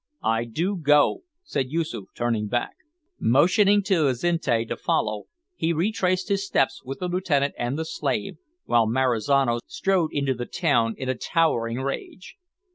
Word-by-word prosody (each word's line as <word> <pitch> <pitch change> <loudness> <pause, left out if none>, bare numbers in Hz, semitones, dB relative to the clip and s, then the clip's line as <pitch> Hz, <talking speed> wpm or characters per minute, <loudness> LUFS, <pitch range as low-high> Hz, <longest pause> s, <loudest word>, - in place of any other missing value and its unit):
"I 115 +1 +1
do 175 - -2
go," 150 - +3 0.2
said 135 - -2
Yoosoof, 155 - -3
turning 115 -3 -1
back. 120 +3 -1 0.5
Motioning 195 - +4
to 180 -7 +2
Azinte 130 -4 0
to - - -3
follow, 105 -1 -1 0.3
he 165 - 0
retraced 185 +1 0
his 200 -1 +1
steps 135 -9 0
with 135 +1 -6
the 180 - -3
lieutenant 170 -6 0
and 120 +4 -2
the 160 - -2
slave 135 -9 -3 0.3
while 115 -2 +3
Marizano 125 +1 +2
strode 190 -5 0
into 140 -2 0
the 120 0 -6
town 140 -11 +1
in 130 - -5
a 130 - +1
towering 120 -4 0
rage. 140 +6 -6
140 Hz, 150 wpm, -24 LUFS, 120-175 Hz, 0.5 s, Motioning